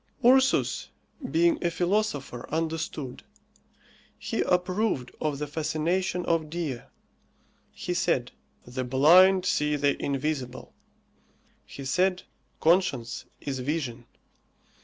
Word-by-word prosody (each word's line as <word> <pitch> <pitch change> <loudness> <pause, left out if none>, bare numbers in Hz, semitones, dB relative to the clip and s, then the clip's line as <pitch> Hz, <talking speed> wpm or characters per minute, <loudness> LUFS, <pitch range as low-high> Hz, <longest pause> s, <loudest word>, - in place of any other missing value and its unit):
Ursus 265 +2 +4 0.4
being 170 +2 +2
a 175 - +2
philosopher 175 - -1
understood. 160 -4 -3 1.0
He - - -2
approved 180 - 0
of 150 -2 -1
the 150 - -3
fascination 160 +4 -1
of 165 -2 0
Dea. 155 -7 -3 0.9
He - - -4
said, - - 0 0.3
The 130 +1 -4
blind 175 +9 +6
see 150 -4 +1
the 145 -1 0
invisible. 135 -2 -3 0.9
He 135 - -9
said, 185 +6 +1 0.4
Conscience 150 -9 +1 0.2
is 135 -2 -4
vision. 125 -4 -3
155 Hz, 95 wpm, -27 LUFS, 135-180 Hz, 1.0 s, blind